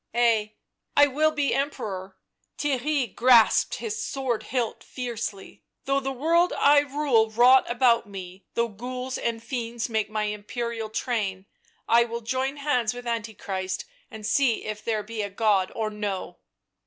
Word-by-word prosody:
" - - -15
Ay, 225 -3 +2 0.4
I 290 - +9
will 300 +3 +2
be 295 -2 0
Emperor 195 -9 -3
" - - -57
— - - -46
Theirry 280 -4 0
grasped 240 -3 +5
his 445 0 -4
sword 260 -5 -2
hilt 240 -2 -3
fiercely 235 -6 -6
— - - -58
" - - -48
though 275 0 +2
the 270 0 -3
world 335 +7 +2
I 290 +1 +5
rule 280 -6 +2
rot 245 +4 +5
about 240 -2 +3
me, 185 -1 -9
though 235 0 +2
ghouls 250 +4 -5
and 230 -1 -2
fiends 235 -1 -3
make 220 -2 0
my 215 0 -1
Imperial 220 +2 -4
train 210 -5 -2 0.2
— - - -38
I 235 +1 +5
will 235 0 -5
join 260 +4 -2
hands 250 -6 0
with 245 0 -8
Antichrist 210 - -3 0.2
and 220 -1 -9
see 245 0 +2
if 215 0 -5
there 220 -2 -1
be 220 +1 -5
a 205 - -3
God 200 -2 +1
or 220 -1 -2
no 200 -4 -4
235 Hz, 170 wpm, -26 LUFS, 215-260 Hz, 0.4 s, I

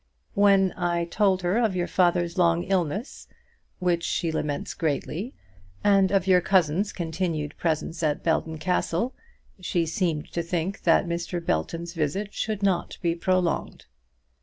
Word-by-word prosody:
When 195 -2 +4
I 175 -1 0
told 190 +1 +1
her 180 +6 +2
of 220 -5 +1
your 175 -1 0
father's 175 -2 +1
long 170 -2 +3
illness, 190 - -2 0.5
which 175 -2 +1
she 165 -1 -1
laments 150 -2 -3
greatly, 165 - -2 0.5
and 195 -2 +4
of 195 -2 +2
your 185 -2 +5
cousin's 185 +1 +2
continued 160 -3 -3
presence 165 0 -1
at 150 -2 0
Belton 160 -1 0
Castle, 180 +7 0 0.5
she 175 -2 0
seemed 160 -2 -2
to 170 - -1
think 175 +3 -3
that 165 0 +4
Mr. 170 +1 -3
Belton's 170 - -2
visit 185 +6 -2
should 215 -2 -3
not 190 -3 0
be 170 -1 +2
prolonged. 180 -1 -1
175 Hz, 140 wpm, -26 LUFS, 165-190 Hz, 0.5 s, your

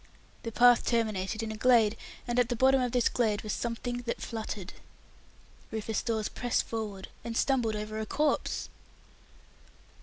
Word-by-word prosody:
The 230 - -5
path 245 +1 +6
terminated 220 -2 0
in 220 - -3
a - - -5
glade, 230 -2 +4 0.3
and 240 +1 +1
at 245 -1 +3
the 245 - 0
bottom 265 +2 +4
of 250 -1 0
this 245 -1 +3
glade 220 -4 +1
was 215 - -2
something 240 +1 -3
that - - -2
fluttered. 215 -5 -5 1.0
Rufus 220 0 -2
Dawes 220 -3 -1
pressed 245 -1 0
forward, 210 -4 -5
and 230 -1 -3
stumbled 245 -5 +2
over 215 +1 -4
a 220 - -3
corpse! 300 -1 0
230 Hz, 155 wpm, -30 LUFS, 215-245 Hz, 1.0 s, path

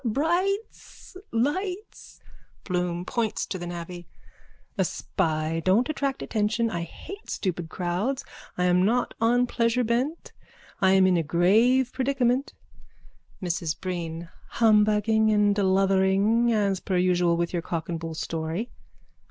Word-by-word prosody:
Bright's! 345 - -2 0.2
Lights! 360 - -3 0.4
BLOOM: 180 -1 -2
(Points 230 -2 -1
to 185 - -5
the 175 - -5
navvy.) 175 0 -7 0.7
A - - +2
spy. 155 +1 -2
Don't 205 - +3
attract 275 -3 -2
attention. 220 +1 0
I 170 - -3
hate 390 - -9
stupid 175 -4 -3
crowds. 185 - -2 0.3
I 180 - +1
am 180 0 +3
not 240 +5 +1
on 245 +2 +3
pleasure 235 0 +1
bent. 250 +8 -2 0.5
I 190 0 +5
am 190 -1 +5
in 185 -1 +3
a - - +2
grave 220 - +3
predicament. 260 0 0 0.9
MRS 170 -3 -2
BREEN: 170 -2 -5 0.3
Humbugging 215 0 +4
and 210 -1 +3
deluthering 195 +4 +3
as 200 -4 +1
per 190 -2 -2
usual 180 -1 +2
with 170 +1 -2
your 175 - -1
cock 165 -1 -4
and 170 -2 -3
bull 165 -1 -6
story. 165 +8 -3
200 Hz, 130 wpm, -26 LUFS, 175-240 Hz, 0.9 s, I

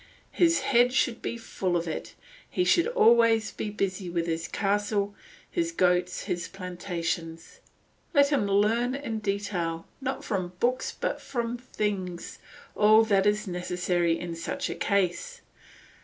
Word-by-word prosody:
His 335 -1 +3
head 245 0 +3
should 245 -3 +1
be 235 - -3
full 185 -6 -2
of 170 0 -3
it, 160 - -5 0.3
he 360 - 0
should 340 -1 +3
always 230 - +4
be 215 - -4
busy 195 -3 -2
with 170 -1 -1
his 165 0 -2
castle, 205 0 0 0.4
his 335 -2 0
goats, 180 - +1
his 175 -1 -3
plantations. 175 - -5 0.5
Let 280 -3 +5
him 275 -9 +1
learn 225 +6 +2
in 230 -6 -4
detail, 195 -5 -2 0.2
not 265 0 -3
from 185 -4 -2
books 250 +2 +1
but - - -2
from 240 -2 -3
things, 200 -7 -4 0.4
all 215 +1 +6
that 200 -2 +3
is 210 +1 +1
necessary 180 -1 0
in 170 -1 -5
such 280 +12 -3
a - - -4
case. 200 - -1
205 Hz, 140 wpm, -27 LUFS, 180-240 Hz, 0.5 s, all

